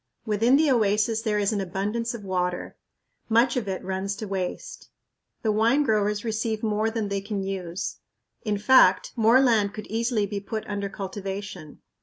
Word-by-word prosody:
Within 225 +4 +3
the 305 -2 +3
oasis 215 -1 +2
there 215 -2 0
is 205 +1 +1
an 205 - -1
abundance 210 +6 -2
of 220 - -8
water. 180 -2 -2 0.5
Much 235 +2 +3
of 240 -5 -2
it 190 -1 -3
runs 190 +1 -3
to 215 +1 -6
waste. 195 - -5 0.5
The 220 - +2
wine 230 +7 +3
growers 210 -2 0
receive 220 0 -2
more 215 0 +1
than 220 -2 -3
they 200 0 -1
can 200 -1 -3
use; 190 -1 -4 0.5
in 210 -2 0
fact, 260 +6 +5
more 230 +2 +5
land 220 -6 +2
could 215 - -6
easily 225 -1 0
be 200 0 -4
put 215 +2 -5
under 200 -1 -3
cultivation. 195 -4 -6
210 Hz, 170 wpm, -25 LUFS, 195-225 Hz, 0.5 s, fact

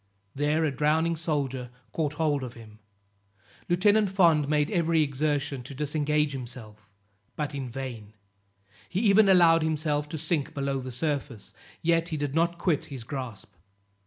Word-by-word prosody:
There 150 +3 +1
a 150 - +1
drowning 155 +4 +1
soldier 140 -6 -2 0.2
caught 150 -3 -1
hold 150 -2 0
of 125 -2 -7
him. 110 -2 -14 0.9
Lieutenant 205 +4 +4
Fond 170 -6 +4
made 150 -1 +1
every 165 -4 +2
exertion 145 -1 -1
to 135 +3 -9
disengage 150 +1 0
himself, 115 -6 -9 0.5
but 150 -1 -3
in 135 -3 -4
vain; 120 -5 -7 0.8
he 185 - -1
even 205 -1 +5
allowed 170 -3 +6
himself 150 -2 -1
to 160 - -4
sink 155 -1 -2
below 140 -1 -1
the 130 0 -6
surface, 130 -6 -3 0.3
yet 165 0 +2
he 155 - -2
did 145 -2 -2
not 170 +2 +1
quit 165 -4 0
his 135 -5 -8
grasp. 115 -6 -7
150 Hz, 150 wpm, -27 LUFS, 135-165 Hz, 0.9 s, allowed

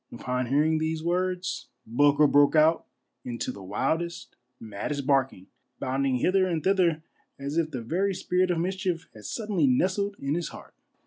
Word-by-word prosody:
Upon 125 +1 -3
hearing 155 +4 +2
these 160 0 -2
words, 180 +1 -1 0.2
Bulger 145 +5 +4
broke 145 +1 +4
out 155 +2 +4 0.4
into 120 -1 -4
the 100 - -11
wildest, 160 - -2 0.2
maddest 115 +7 -4
barking, 135 -9 +1 0.3
bounding 135 0 0
hither 185 +9 +2
and 165 -4 -2
thither 175 -5 +2 0.3
as 140 +2 -5
if 165 -2 +1
the 125 -6 -5
very 190 - 0
spirit 180 +1 +1
of 175 - +1
mischief 185 -1 -2
had 105 -2 -13
suddenly 205 - 0
nestled 190 +10 +1
in 140 +1 -2
his 170 +1 -2
heart. - - -12
155 Hz, 155 wpm, -27 LUFS, 135-180 Hz, 0.4 s, Bulger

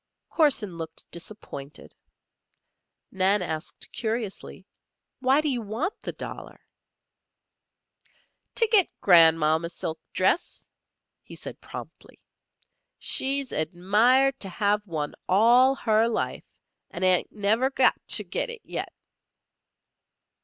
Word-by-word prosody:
Corson 235 - +1
looked 160 0 -8
disappointed. 165 -6 -8 1.2
Nan 190 +1 +2
asked, 160 -2 -6
curiously: 220 -3 -4 0.5
"Why 265 +3 +3
do 305 - -2
you 255 -4 -1
want 225 - -4
the - - -4
dollar?" - - -9 2.0
"To 460 - +3
git 415 -5 +4
Gran'mom 165 -3 +5
a 170 - -3
silk 160 -1 -5
dress," 185 - 0 0.5
he - - -12
said - - -9
promptly. - - -11 0.8
"She's 275 0 +1
admired 210 - +2
to 195 - -3
have 205 +3 0
one 155 -4 -3 0.2
all 240 +7 +5
her 220 -2 +2
life, 230 - -3 0.4
and 175 - -6
ain't 185 -1 +2
never 220 +5 +1
got 265 -1 +3
to - - +4
git - - -3
it 470 -2 -8
yet." - - -5
210 Hz, 110 wpm, -26 LUFS, 175-260 Hz, 2.0 s, Gran'mom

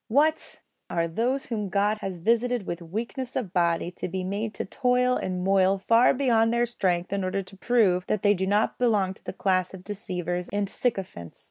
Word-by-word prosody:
What! 295 +7 +1 0.3
are 170 0 0
those 245 +10 -1
whom 210 -4 -3
God 205 +2 +1
has 190 -3 -4
visited 235 +2 +1
with 175 -1 -4
weakness 235 - -5
of 205 -8 -3
body 170 -1 +1
to - - -5
be 185 +1 -3
made 205 +3 -3
to - - -3
toil 250 +2 +2
and 180 -1 -2
moil 195 0 +3
far 230 +5 +4
beyond 235 -4 +2
their 235 0 +2
strength 185 -6 -1
in 200 -1 -1
order 185 +1 -1
to 190 +1 -14
prove 195 -6 +2
that 215 - -1
they 205 0 +5
do 190 -1 -2
not 205 +2 +1
belong 210 -6 +2
to - - -20
the - - -5
class 185 -1 0
of 180 - -12
deceivers 180 -3 -4
and 205 0 0
sycophants? 190 - -3
200 Hz, 200 wpm, -26 LUFS, 185-235 Hz, 0.3 s, they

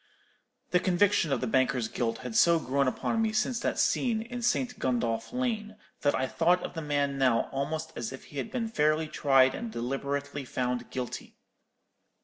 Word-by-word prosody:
The 180 - +4
conviction 185 -2 +2
of 135 - +1
the - - 0
banker's 125 -1 +1
guilt 115 0 -2
had 120 -3 -5
so 170 -1 +6
grown 140 -2 0
upon 225 - 0
me 220 -1 +1
since 230 +2 0
that - - -1
scene 225 -4 +1
in 245 +1 -6
St. 245 +1 0
Gundolph 115 -3 -1
Lane, 225 -4 -2 0.3
that 145 - +2
I 130 - 0
thought 175 +6 +2
of - - -5
the 165 - -4
man 145 -2 0
now 125 -4 +4
almost 155 +4 -3
as 120 0 -4
if 130 - -9
he 145 - -7
had - - -4
been 240 -3 -2
fairly 155 -6 +1
tried 135 -3 +4
and 230 0 -5
deliberately 140 - -3
found 125 -1 -2
guilty. 125 -2 -5
145 Hz, 180 wpm, -29 LUFS, 130-205 Hz, 0.3 s, so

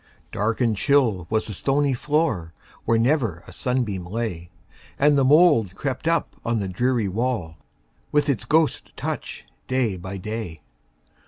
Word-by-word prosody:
Dark 110 +4 -1
and 115 -3 +2
chill 115 - +2
was 110 0 0
the 105 - -5
stony 140 +6 +1
floor, 140 - 0 0.3
Where 115 - +3
never 115 - +1
a - - -12
sunbeam 120 -8 -1
lay, 90 -3 -4 0.5
And 145 +1 +4
the 140 - +3
mould 140 - +5
crept 140 +6 -3
up 165 -2 0
on 115 -1 0
the 100 - -2
dreary 120 +3 0
wall, 100 -5 -2 0.5
With 150 0 +2
its 115 -7 0
ghost 155 +3 +1
touch, - - -5 0.2
day 125 -7 0
by 95 +2 -6
day. 105 -4 -5
115 Hz, 150 wpm, -23 LUFS, 95-140 Hz, 0.5 s, mould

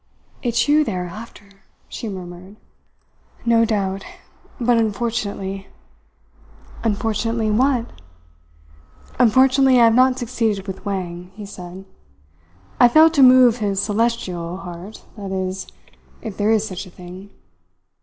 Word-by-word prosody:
"It's 235 +1 0
you 300 +1 +4
they 220 -9 -3
are 180 0 -3
after," 205 +2 -10 0.4
she 225 - -6
murmured. 185 0 -9 0.9
"No 230 -1 +4
doubt, 195 -3 -2 0.6
but 240 -1 +3
unfortunately 200 -3 -3 0.6
" - - -22
"Unfortunately 220 +1 -1
what?" 245 +1 +1 1.3
"Unfortunately, 260 +2 +5
I - - +6
have 225 - +4
not 255 +1 +4
succeeded 225 -5 -2
with 190 -1 -7
Wang," 180 -3 -4
he 210 -1 -8
said. 185 -1 -10 0.9
"I 245 - +8
failed 315 +6 +6
to 285 - +3
move 255 -2 +7
his 200 -4 -1
Celestial, 200 -5 -1
heart 180 +2 -10
that 200 -2 -6
is, 190 0 -3 0.6
if 215 -3 -6
there 205 +2 0
is 220 -1 +2
such 185 +1 -6
a - - -12
thing. 180 +3 -11
210 Hz, 125 wpm, -20 LUFS, 190-235 Hz, 1.3 s, I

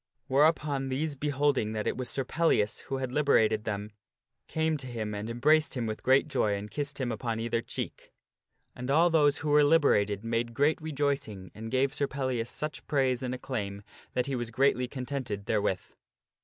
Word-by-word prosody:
Whereupon 140 -1 +2
these 145 +4 -1
beholding 140 -5 0
that 110 -1 -2
it - - 0
was 130 -1 -4
Sir 135 - -1
Pellias 130 -8 +1
who 135 - -2
had 130 -1 -3
liberated 110 -7 +3
them, 105 0 -3 0.6
came 160 0 0
to 130 -2 -7
him 110 -3 -4
and 105 +2 -4
embraced 150 +7 +3
him 120 - -1
with 110 -1 -4
great 130 +3 +4
joy 105 -8 +1
and 100 +1 -6
kissed 145 -1 -4
him 125 -2 -1
upon 115 0 -3
either 115 0 -1
cheek. - - -6 0.6
And 125 +1 -6
all 165 +5 +4
those 145 -3 +4
who 150 - -3
were 150 0 +6
liberated 110 -10 +3
made 115 +1 -1
great 145 +5 +2
rejoicing 140 -11 -2
and 110 +1 -7
gave 130 +2 +1
Sir 140 - 0
Pellias 130 -4 -2
such 150 -3 -5
praise 130 -3 +1
and 130 -1 -2
acclaim 100 -6 -4 0.3
that 125 - +1
he 140 - -2
was 120 -2 -3
greatly 125 +1 +2
contented 125 -6 -4
therewith. 100 -4 0
130 Hz, 185 wpm, -29 LUFS, 110-145 Hz, 0.6 s, were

